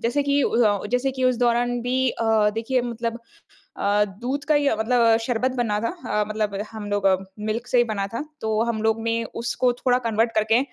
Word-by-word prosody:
जैसे 255 Hz, +5 st, +1 dB
कि 280 Hz, 0 st, +2 dB
अ, 220 Hz, -5 st, +2 dB
जैसे 250 Hz, +2 st, +1 dB
कि 260 Hz, -1 st, -2 dB
उस 255 Hz, -1 st, +3 dB
दौरान 245 Hz, 0 st, +1 dB
भी 255 Hz, +2 st, +1 dB
अ, 230 Hz, -, -4 dB, 0.3 s
देखिए 240 Hz, +3 st, 0 dB
मतलब 235 Hz, -1 st, -3 dB, 0.6 s
अ, 205 Hz, +1 st, +2 dB
दूध 265 Hz, +4 st, -3 dB
का 305 Hz, -, +2 dB
ही 290 Hz, -1 st, +3 dB
मतलब 230 Hz, 0 st, +3 dB
शरबत 250 Hz, +1 st, 0 dB
बना 220 Hz, -4 st, 0 dB
था 230 Hz, -, -1 dB, 0.3 s
अ, 210 Hz, -, +2 dB
मतलब 210 Hz, -2 st, -2 dB
हम 220 Hz, -2 st, -7 dB
लोग 205 Hz, -1 st, 0 dB, 0.3 s
मिल्क 215 Hz, +3 st, -3 dB
से 250 Hz, -, +2 dB
ही 240 Hz, -, +5 dB
बना 205 Hz, -4 st, -2 dB
था। 230 Hz, +6 st, -4 dB, 0.2 s
तो 220 Hz, 0 st, 0 dB
हम 230 Hz, -2 st, -2 dB
लोग 220 Hz, 0 st, +1 dB
ने 230 Hz, 0 st, 0 dB, 0.2 s
उसको 245 Hz, +1 st, +1 dB
थोड़ा 245 Hz, 0 st, +1 dB
कन्वर्ट 225 Hz, +1 st, +1 dB
करके 220 Hz, +1 st, +3 dB
235 Hz, 200 wpm, -23 LUFS, 220-250 Hz, 0.6 s, ही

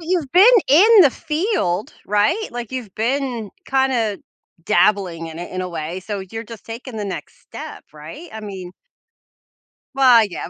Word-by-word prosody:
You've 330 Hz, -5 st, -2 dB
been 370 Hz, +3 st, +7 dB, 0.2 s
in 405 Hz, +10 st, +7 dB
the 280 Hz, -, +5 dB
field, 305 Hz, -, -2 dB
right? 210 Hz, -, +1 dB
Like, 240 Hz, 0 st, -7 dB
you've 245 Hz, -7 st, -6 dB
been 240 Hz, -2 st, -2 dB, 0.2 s
kinda 255 Hz, -6 st, +1 dB, 0.5 s
dabbling 190 Hz, -6 st, +1 dB
in 160 Hz, 0 st, -9 dB
it 175 Hz, -, -7 dB
in 185 Hz, -, -4 dB
a 180 Hz, -, -3 dB
way, 170 Hz, +2 st, -5 dB
so 200 Hz, +1 st, -5 dB
you're 225 Hz, +1 st, -6 dB
just 225 Hz, -1 st, -11 dB
taking 230 Hz, +1 st, -8 dB
the 210 Hz, -, -3 dB
next 195 Hz, -2 st, -7 dB
step, -, -, -10 dB
right? 155 Hz, -, -11 dB
I 220 Hz, -, -7 dB
mean 190 Hz, -4 st, -8 dB, 1.2 s
Well, 250 Hz, -4 st, +6 dB
yeah, -, -, -6 dB
225 Hz, 160 wpm, -20 LUFS, 190-270 Hz, 1.2 s, been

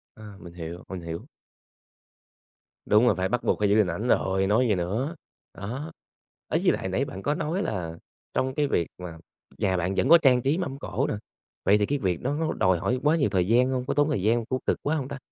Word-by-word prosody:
À, 105 Hz, -3 st, -11 dB
mình 85 Hz, -, -11 dB
hiểu, 85 Hz, 0 st, -7 dB
mình 95 Hz, -2 st, -5 dB
hiểu. 85 Hz, 0 st, -6 dB, 1.6 s
Đúng 110 Hz, +3 st, +5 dB
rồi, -, -, +4 dB
phải 95 Hz, 0 st, -1 dB
bắt 120 Hz, +1 st, -1 dB
buộc -, -, +1 dB
phải 105 Hz, -1 st, +2 dB
giữ 105 Hz, -, +4 dB
hình 105 Hz, -4 st, +4 dB
ảnh 100 Hz, +9 st, -3 dB
rồi, 95 Hz, -3 st, +2 dB
nói 115 Hz, +5 st, +3 dB
gì 105 Hz, -, +2 dB
nữa, 110 Hz, -, -2 dB, 0.4 s
đó. 130 Hz, +11 st, -6 dB, 0.6 s
Đấy, -, -, +1 dB
với -, -, +5 dB
lại -, -, -2 dB
nãy -, -, 0 dB
bạn 95 Hz, -, -8 dB
có 145 Hz, +1 st, +1 dB
nói 175 Hz, +6 st, -1 dB
là 85 Hz, -5 st, -4 dB, 0.4 s
trong 130 Hz, 0 st, -1 dB
cái 150 Hz, -1 st, +1 dB
việc 85 Hz, -, 0 dB
mà 90 Hz, -2 st, -8 dB, 0.4 s
nhà 95 Hz, -2 st, +1 dB
bạn 90 Hz, +2 st, -1 dB
vẫn 135 Hz, -, +1 dB
có 170 Hz, -, +10 dB
trang 130 Hz, -6 st, +4 dB
trí 140 Hz, +7 st, +1 dB
mâm 140 Hz, -7 st, -4 dB
cỗ -, -, -2 dB
nè, -, -, -1 dB, 0.5 s
vậy 100 Hz, -, +5 dB
thì 105 Hz, -, +1 dB
cái 145 Hz, +4 st, -1 dB
việc 90 Hz, -3 st, -1 dB
đó 135 Hz, +3 st, 0 dB
nó 160 Hz, -1 st, 0 dB
đòi 95 Hz, -1 st, +2 dB
hỏi 125 Hz, +8 st, 0 dB
quá 150 Hz, +2 st, +4 dB
nhiều 140 Hz, -9 st, +2 dB
thời 95 Hz, -2 st, +1 dB
gian 125 Hz, +3 st, +4 dB
hông, 130 Hz, -1 st, -1 dB
có -, -, -1 dB
tốn 145 Hz, +2 st, +2 dB
thời 135 Hz, -11 st, 0 dB
gian 110 Hz, +4 st, +3 dB
hông, 115 Hz, -2 st, -2 dB
có 130 Hz, 0 st, 0 dB
cực -, -, +1 dB
quá 150 Hz, +3 st, +1 dB
hông 135 Hz, -4 st, -2 dB
ta? 140 Hz, -, -6 dB
110 Hz, 245 wpm, -26 LUFS, 95-135 Hz, 1.6 s, có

